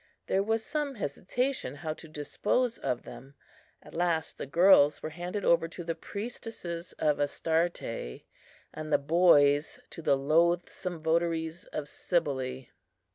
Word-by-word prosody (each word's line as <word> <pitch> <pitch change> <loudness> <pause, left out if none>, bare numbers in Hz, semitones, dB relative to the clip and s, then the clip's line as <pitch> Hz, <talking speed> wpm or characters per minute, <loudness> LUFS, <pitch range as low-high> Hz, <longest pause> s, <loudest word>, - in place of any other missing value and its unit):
There 195 - +2
was 225 +2 0
some 295 -3 -2
hesitation 210 - -2
how 155 +1 -4
to 160 - -12
dispose 220 - -1
of 125 - -2
them; 135 +1 -11 0.5
at - - -14
last 170 -2 -1
the - - -4
girls 160 -2 +5
were 155 - -4
handed 180 +4 -4
over 165 -1 +4
to 175 +1 -8
the 165 0 -2
priestesses 200 -2 -6
of 150 -2 +1
Astarte, 155 - -1 0.5
and 155 0 -6
the - - +6
boys 145 -2 +4
to - - -8
the 140 -3 +3
loathsome 170 +3 +1
votaries 165 0 0
of 150 -2 -5
Cybele. 135 -7 -1
165 Hz, 135 wpm, -29 LUFS, 145-180 Hz, 0.5 s, the